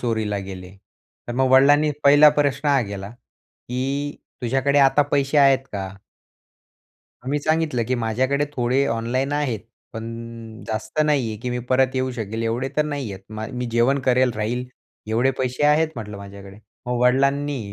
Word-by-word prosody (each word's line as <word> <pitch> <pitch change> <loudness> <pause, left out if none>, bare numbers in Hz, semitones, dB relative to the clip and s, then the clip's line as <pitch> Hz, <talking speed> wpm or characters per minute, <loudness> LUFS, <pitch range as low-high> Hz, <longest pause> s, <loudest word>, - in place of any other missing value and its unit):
चोरीला 110 -4 -1
गेले. 95 0 -9 0.5
तर - - -2
मग 130 0 +2
वडिलांनी 145 +3 +5
पहिला 145 +2 +8
प्रश्न 145 0 +1
हा 140 -2 +4
केला, 100 0 -6
की 135 +4 -6 0.3
तुझ्याकडे 135 +4 +1
आता 140 +1 +5
पैसे 140 +1 +2
आहेत 135 -1 +6
का? 95 -2 -4 1.4
मग 130 - -4
मी 145 - +1
सांगितलं 155 -4 0
की 130 - +1
माझ्याकडे 130 +5 0
थोडे 125 +3 +2
ऑनलाईन 120 +5 -1
आहेत. 140 -7 -1 0.3
पण 115 0 -8
जास्त 110 +7 -3
नाहीये 130 -8 0
की 125 - -2
मी 125 - -2
परत 130 0 +2
येऊ 130 0 0
शकेल 110 -1 -4
एवढे 120 +4 -1
तर 150 - +4
नाहीयेत 135 -10 -4 0.2
माय 110 +1 -5
मी 125 0 -3
जेवण 120 +4 +2
करेल 130 0 +3
राहील, 115 +4 -2 0.4
एवढे 115 +4 +2
पैसे 130 +2 -2
आहेत 155 +2 +3
म्हटलं 105 -3 -6
माझ्याकडे. 100 0 -11 0.3
मग 125 0 -1
वडिलांनी, 135 -2 +1
125 Hz, 155 wpm, -22 LUFS, 115-140 Hz, 1.4 s, पहिला